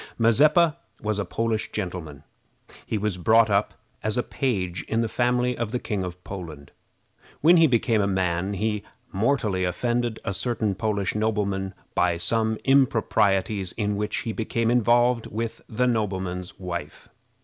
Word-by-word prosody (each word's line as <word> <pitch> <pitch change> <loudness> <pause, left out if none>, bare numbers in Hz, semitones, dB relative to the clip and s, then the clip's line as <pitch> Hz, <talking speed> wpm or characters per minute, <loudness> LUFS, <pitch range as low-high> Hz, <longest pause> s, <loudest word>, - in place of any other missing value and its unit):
Mazeppa 150 +8 +4 0.3
was 105 -1 -1
a 100 - -1
Polish 115 -1 -2
gentleman. 90 -8 -5 0.6
He 110 - -1
was 105 -3 -2
brought 110 +4 +4
up 100 +1 +1 0.3
as 110 +1 -1
a 125 - +1
page 95 -9 -2
in 115 +1 +1
the 115 - 0
family 125 +2 +1
of 115 -2 -3
the 125 - 0
King 105 -5 -3
of 90 0 -7
Poland. 80 -7 -8 0.7
When 170 +4 +7
he 165 -1 +6
became 115 -4 +2
a 100 - +1
man 95 0 0
he 105 +1 -1 0.3
mortally 105 -3 +1
offended 120 +5 -1
a 95 - -1
certain 110 -1 -1
Polish 100 -1 -1
nobleman 100 -3 -1 0.2
by 90 -1 +2
some 110 +5 0
improprieties 105 -7 +2
in 105 -2 -1
which 105 +1 -2
he 115 - -3
became 115 +1 0
involved 120 0 +3
with 115 +1 -4
the 120 +3 0
nobleman's 95 -6 -2
wife. 85 -5 -6
105 Hz, 150 wpm, -25 LUFS, 95-115 Hz, 0.7 s, When